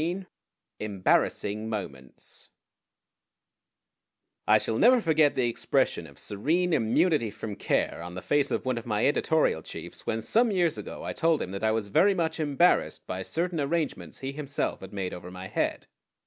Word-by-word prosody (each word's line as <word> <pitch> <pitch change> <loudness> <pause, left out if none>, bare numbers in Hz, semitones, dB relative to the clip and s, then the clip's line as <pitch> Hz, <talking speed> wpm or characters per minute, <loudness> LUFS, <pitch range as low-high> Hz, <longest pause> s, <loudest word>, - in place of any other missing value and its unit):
XIII 180 +4 -2 0.5
EMBARRASSING 105 +1 0
MOMENTS 70 - -7 2.0
I - - +7
shall 110 - -1
never 250 +2 +6
forget 160 -6 +3
the 125 -2 +2
expression 120 - 0
of 70 - -16
serene 160 - 0
immunity 120 +2 +2
from 105 0 -6
care 100 - 0
on 90 +1 -7
the 95 - -6
face 145 -1 +2
of - - -2
one 130 -2 0
of 115 - -12
my 105 -1 +1
editorial 145 - +2
chiefs - - -9
when 110 0 -1
some 235 +1 +3
years 175 -6 +2
ago - - -7
I - - -3
told 165 -1 +2
him 90 - -4
that 100 +2 -5
I 110 - +3
was 110 -2 -1
very 195 - +4
much 165 -2 -1
embarrassed 155 +3 +2
by 95 0 -4
certain 170 - -2
arrangements 150 +1 -2
he 135 0 -3
himself 140 -1 -3
had 95 - -9
made 95 -3 -3
over 90 0 -8
my 90 +1 -8
head. - - -2
130 Hz, 170 wpm, -27 LUFS, 100-165 Hz, 2.0 s, I